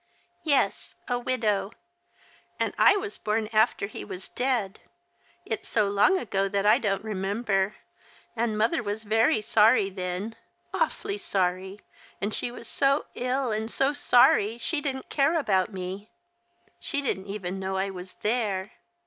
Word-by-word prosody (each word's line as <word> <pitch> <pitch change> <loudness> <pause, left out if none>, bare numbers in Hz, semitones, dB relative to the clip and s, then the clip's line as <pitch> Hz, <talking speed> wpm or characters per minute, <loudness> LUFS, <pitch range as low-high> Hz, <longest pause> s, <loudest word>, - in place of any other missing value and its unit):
"Yes, 290 -4 +1
a 245 -1 0
widow. 220 -5 0 0.9
And - - 0
I 405 - +6
was 415 +1 -5
born 215 +1 0
after 215 -1 +3
he 200 - -7
was 185 - -7
dead. 245 -6 -1 0.7
It's - - -4
so 210 -3 +2
long 205 - +4
ago 195 - -1
that 200 0 0
I 210 - +6
don't 195 -2 -1
remember, 200 -1 -1 0.6
and 225 -2 0
mother 220 +2 +2
was 210 +1 -4
very 225 +5 +3
sorry 210 -1 +4
then, 185 +4 -4 0.4
awfully 410 -1 -1
sorry, 190 - -1 0.4
and 205 +2 -2
she - - -2
was 240 -1 -10
so 275 +3 +2
ill 255 0 -1
and 220 +1 -2
so 270 +4 +1
sorry 240 -6 +4
that 235 - -12
she 305 +4 0
didn't 265 -3 -4
care 285 +3 +3
about 200 - +1
me. 190 +2 -6 0.7
She 285 -2 -2
didn't 190 -7 -2
even 195 -2 -4
know 190 0 -2
I 195 +1 -1
was 185 0 -9
there. 210 -3 0
215 Hz, 150 wpm, -27 LUFS, 195-250 Hz, 0.9 s, I